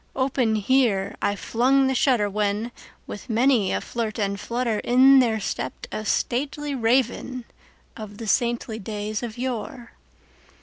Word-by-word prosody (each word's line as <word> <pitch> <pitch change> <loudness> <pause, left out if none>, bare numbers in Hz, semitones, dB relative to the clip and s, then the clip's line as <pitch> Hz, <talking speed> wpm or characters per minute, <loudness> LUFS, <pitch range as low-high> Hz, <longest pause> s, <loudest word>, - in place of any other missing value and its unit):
Open 260 -4 +1
here 215 -3 +1
I 205 - 0
flung 260 +6 +2
the 265 - +1
shutter, 245 -5 +2
when, 210 +3 -1 0.3
with 205 - -9
many 230 -3 +2
a - - 0
flirt 225 -3 -4
and 200 -2 -1
flutter, 235 0 -2
In 265 +2 +6
there 225 -4 +2
stepped 355 - -5
a 215 - -4
stately 285 +7 -1
Raven 250 0 0 0.5
of 210 -2 -9
the 225 - -7
saintly 235 0 0
days 210 +1 -4
of 235 -2 -6
yore. 245 -1 -5
235 Hz, 140 wpm, -24 LUFS, 215-260 Hz, 0.5 s, In